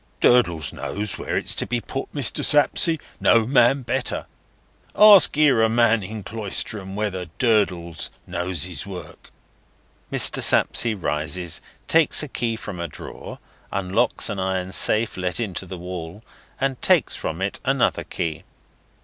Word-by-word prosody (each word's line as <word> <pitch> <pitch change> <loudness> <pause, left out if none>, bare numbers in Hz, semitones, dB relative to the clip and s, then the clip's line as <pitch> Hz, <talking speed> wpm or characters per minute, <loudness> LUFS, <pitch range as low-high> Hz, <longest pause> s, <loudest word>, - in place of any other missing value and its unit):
"Durdles 85 - +2
knows 105 -1 -4
where - - -3
it's - - -1
to - - -2
be 120 - -1
put, 135 +3 -6
Mr. 140 -5 +1
Sapsea; 160 +2 +3 0.2
no 115 -1 +4
man 130 +1 +3
better. 125 +3 -2 0.7
Ask 205 -8 +7
'ere 140 -7 +4
a 110 - +3
man 115 -1 +2
in 105 +2 -7
Cloisterham 100 -2 -2
whether 100 -4 -3
Durdles 90 -8 0 0.2
knows 90 -2 -2
his 90 +1 -3
work." 90 -3 -10 0.8
Mr. - - +4
Sapsea 115 -2 +3
rises, 85 0 -2 0.3
takes 160 -1 +4
a - - -5
key 115 -3 -3
from 100 -5 -8
a 85 - -3
drawer, - - -10 0.3
unlocks 100 +5 +1
an 100 - -4
iron 95 -1 -2
safe 110 +3 +3
let 90 +2 -2
into 95 -4 -4
the 95 - -7
wall, 90 +2 -8 0.4
and 135 -1 -2
takes - - +2
from 80 +2 -5
it 95 +1 -3
another 135 -2 0
key. 80 -2 -5
105 Hz, 145 wpm, -22 LUFS, 90-120 Hz, 0.8 s, Ask